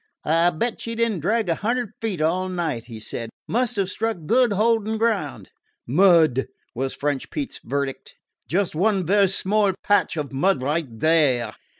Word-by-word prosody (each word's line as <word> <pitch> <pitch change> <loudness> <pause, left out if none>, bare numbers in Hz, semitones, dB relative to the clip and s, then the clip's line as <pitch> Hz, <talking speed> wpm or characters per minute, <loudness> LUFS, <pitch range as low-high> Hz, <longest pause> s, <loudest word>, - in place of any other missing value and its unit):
"I 165 +2 +3
'll - - -6
bet 235 +9 -2
she 230 0 -4
did 230 0 +1
n't 185 -7 -4
drag 215 +5 +1
a 170 - +2
hundred 235 +4 -2
feet 205 -8 -2
all 180 +4 0
night," 165 -10 -3
he 115 -2 -9
said. 115 +1 -6 0.2
"Must 245 0 0
've 195 -2 +1
struck 225 +3 -2
good 245 +6 +3
holding 220 +1 +1
ground." 215 -10 -1 0.3
"Mud," 160 -3 +4 0.3
was 130 +2 -3
French 145 -2 -2
Pete's 290 -3 -5
verdict. 140 +2 -4 0.3
"Just 190 +2 0
one 190 +2 +1
vaire 200 +3 +4
small 195 +1 +1
patch 205 -4 +2
of 145 -2 -3
mud 140 +1 +1
right 150 +3 -1
there. 125 -3 +2
185 Hz, 175 wpm, -23 LUFS, 145-215 Hz, 0.3 s, Mud